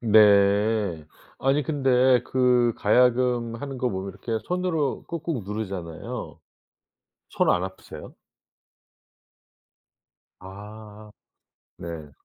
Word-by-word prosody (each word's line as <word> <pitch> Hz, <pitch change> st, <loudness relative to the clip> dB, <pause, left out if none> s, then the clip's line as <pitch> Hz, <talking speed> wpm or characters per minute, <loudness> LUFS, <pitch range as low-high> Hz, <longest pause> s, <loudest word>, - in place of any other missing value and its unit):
네. 100 Hz, -5 st, +3 dB, 0.3 s
아니 135 Hz, +2 st, +1 dB
근데 130 Hz, -3 st, +3 dB
그 125 Hz, -2 st, +2 dB
가야금 120 Hz, +1 st, +2 dB
하는 135 Hz, +1 st, -6 dB
거 125 Hz, -, 0 dB
보면 95 Hz, 0 st, -4 dB
이렇게 110 Hz, +4 st, -4 dB
손으로 175 Hz, -6 st, -1 dB
꾹꾹 165 Hz, -6 st, -4 dB
누르잖아요. 95 Hz, -5 st, -6 dB, 0.9 s
손 -, -, +2 dB
안 90 Hz, -, +1 dB
아프세요? 95 Hz, 0 st, -10 dB, 2.3 s
아. 105 Hz, +2 st, -12 dB, 0.7 s
네. 80 Hz, -3 st, -8 dB
110 Hz, 170 characters per minute, -25 LUFS, 100-130 Hz, 2.3 s, 네